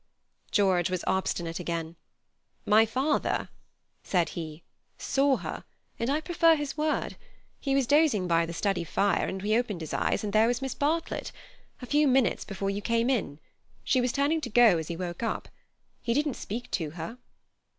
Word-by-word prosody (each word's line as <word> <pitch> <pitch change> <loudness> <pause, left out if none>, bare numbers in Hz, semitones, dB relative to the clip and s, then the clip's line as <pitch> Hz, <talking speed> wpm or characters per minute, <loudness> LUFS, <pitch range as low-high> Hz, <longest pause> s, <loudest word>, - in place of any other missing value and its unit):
George 185 -4 +2
was 185 -1 -2
obstinate 175 -3 -1
again. 170 -1 -4 0.7
"My 220 +2 +5
father," 265 +6 0 0.5
said 175 -4 +1
he, 160 -1 -7 0.3
"saw 275 -1 +2
her, - - -6 0.4
and 230 +2 -1
I 290 +2 +2
prefer 330 -1 +4
his 290 -2 -4
word. 305 0 -1 0.4
He 275 -2 0
was 275 -2 +3
dozing 285 - +3
by 165 -1 +2
the - - -5
study 195 0 0
fire, 195 +3 +1
and 190 0 -4
he 215 +1 +2
opened 225 -7 -1
his 160 - -6
eyes, - - 0
and 205 -1 -3
there 220 +1 +5
was 240 0 0
Miss 270 -1 -3
Bartlett. 320 +3 -1 0.5
A - - -3
few 295 +3 +3
minutes 260 -2 +2
before 195 -1 -3
you 200 +1 -3
came 230 +3 +1
in. 160 - -2 0.4
She 255 - +2
was 245 0 +1
turning 290 +4 +1
to 245 - -4
go 230 -6 +5
as 160 - -5
he 170 - -4
woke 175 +1 -5
up. 230 - -3 0.5
He 235 0 -1
didn't 295 -1 +1
speak 235 +2 -6
to 160 -4 -1
her." 195 +10 -6
225 Hz, 180 wpm, -28 LUFS, 180-270 Hz, 0.7 s, My